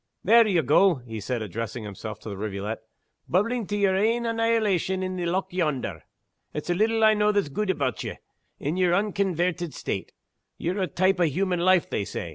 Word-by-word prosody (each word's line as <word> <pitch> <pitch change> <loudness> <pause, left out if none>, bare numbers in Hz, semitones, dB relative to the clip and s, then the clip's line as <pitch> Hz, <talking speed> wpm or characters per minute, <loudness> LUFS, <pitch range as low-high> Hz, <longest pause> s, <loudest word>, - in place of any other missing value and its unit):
"There 230 +3 +6
ye 185 -5 +3
go," 170 +7 +5
he 120 -4 -8
said, 115 +2 -3
addressing 115 +3 -5
himself 105 +1 -7
to - - -7
the 100 - -5
rivulet, 105 +2 -4 0.5
"bubblin' 220 +4 +1
to 205 - -2
yer 195 -2 +3
ain 230 +4 +1
annihilation 220 -5 +1
in 185 0 -3
the 175 -1 -2
loch 185 +1 -1
yonder! 140 - -1 0.5
It's 150 +3 -4
little 220 +5 +2
I 215 0 +7
know 210 0 +3
that's 205 -7 0
gude 205 +8 -2
aboot 190 - -1
ye, - - -5 0.4
in 150 +5 -2
yer 180 -2 +3
unconvairted 180 -4 0
state. - - -4 0.5
Ye're 185 +4 -2
a 185 - +1
type 185 +1 +1
o' 175 - +4
human 180 +4 0
life, 185 -1 +4
they 105 - -2
say. 85 - -5
180 Hz, 190 wpm, -26 LUFS, 140-205 Hz, 0.5 s, I